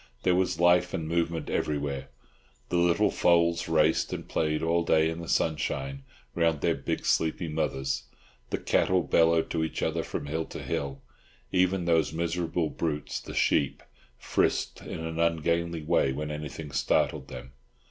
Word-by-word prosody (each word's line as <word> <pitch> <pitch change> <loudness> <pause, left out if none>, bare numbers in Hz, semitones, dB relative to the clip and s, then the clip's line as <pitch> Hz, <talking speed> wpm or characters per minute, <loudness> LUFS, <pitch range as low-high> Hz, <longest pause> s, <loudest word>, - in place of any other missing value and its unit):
There 90 - +3
was 90 -1 +1
life 90 +1 +4
and 80 - -3
movement 85 0 -1
everywhere. 70 -2 -2 0.6
The 90 - +1
little 85 +4 +3
foals 85 -1 +3
raced 80 0 +3
and - - -5
played 75 -1 0
all 85 +1 +2
day 80 -1 +3
in 80 - -6
the 85 - -8
sunshine 70 -3 -1 0.3
round 80 -3 +1
their - - +2
big - - -3
sleepy 80 +2 +1
mothers; 70 -3 -2 0.4
the - - -1
cattle 95 -1 +2
bellowed 80 +2 +3
to 80 -1 0
each 80 - -3
other - - 0
from - - -5
hill 80 +2 -2
to - - -8
hill; 70 -1 -3 0.5
even 90 -1 +2
those 80 -3 +2
miserable 85 0 -1
brutes, 75 -3 -3
the - - -9
sheep, 70 - +1 0.3
frisked - - 0
in - - -6
an 80 0 -4
ungainly 85 0 0
way 70 -2 +2
when 75 +2 -4
anything 75 0 -6
startled 65 -1 +1
them. 65 0 -9
80 Hz, 155 wpm, -28 LUFS, 75-85 Hz, 0.6 s, life